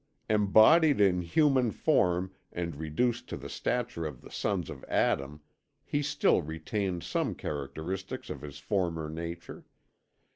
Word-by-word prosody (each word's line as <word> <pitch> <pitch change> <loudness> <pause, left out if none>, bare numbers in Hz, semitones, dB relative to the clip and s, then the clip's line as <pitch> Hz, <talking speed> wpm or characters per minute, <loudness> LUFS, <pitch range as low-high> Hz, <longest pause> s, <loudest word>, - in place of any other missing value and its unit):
Embodied 110 +9 +6
in 95 -3 +4
human 130 - +3
form 90 -2 +1 0.2
and 85 -3 -4
reduced 80 +11 -1
to - - -4
the - - -8
stature 120 -8 -2
of 75 -5 -5
the - - -13
sons 100 -5 -1
of 65 - -9
Adam, 70 +2 0 0.4
he 145 - 0
still 145 -8 +2
retained 85 +4 -3
some - - -1
characteristics 80 +7 -5
of 70 - -6
his 70 -1 -8
former 85 -1 -1
nature. 85 +2 -7
90 Hz, 135 wpm, -30 LUFS, 80-110 Hz, 0.4 s, Embodied